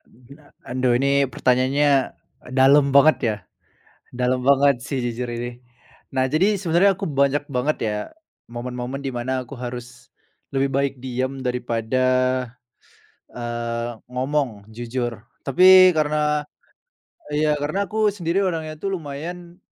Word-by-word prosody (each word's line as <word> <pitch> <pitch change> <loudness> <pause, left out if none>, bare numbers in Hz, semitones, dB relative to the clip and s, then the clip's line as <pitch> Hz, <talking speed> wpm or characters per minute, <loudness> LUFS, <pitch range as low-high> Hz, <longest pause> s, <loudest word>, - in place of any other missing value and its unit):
Aduh - - -24
gila, 145 +3 -16 0.2
aduh 125 0 0
ini 140 +1 +2
pertanyaannya 135 +2 +2 0.4
dalem 140 +2 +5
banget 145 +3 +6
ya, 110 -4 0 0.8
dalem 125 +1 0
banget 140 -2 +4
sih 135 - -3
jujur 120 +1 -3
ini. 120 +1 -5 0.5
Nah, 130 0 +2
jadi 190 +8 +3
sebenarnya 185 +2 +3
aku - - -4
banyak 140 +1 +1
banget 140 +3 0
ya, 105 - -2 0.5
momen-momen 125 +2 -5
di 135 - -3
mana 130 +2 -2
aku 125 - -10
harus 125 0 -8 0.4
lebih 135 0 +1
baik 140 0 0
diam 130 +1 -3
daripada, 125 -1 -1 1.3
eee, 120 0 -4 0.2
ngomong 125 -5 -2
jujur. 120 -1 -4 0.2
Tapi 185 +5 +7
karena 150 0 +1 0.9
iya, 150 +1 +2
karena 155 +8 -1
aku 215 +1 +1
sendiri 175 -1 -1
orangnya 160 -4 -2
tuh 195 -1 -2
lumayan, 170 +4 -8
135 Hz, 125 wpm, -22 LUFS, 125-150 Hz, 1.3 s, Tapi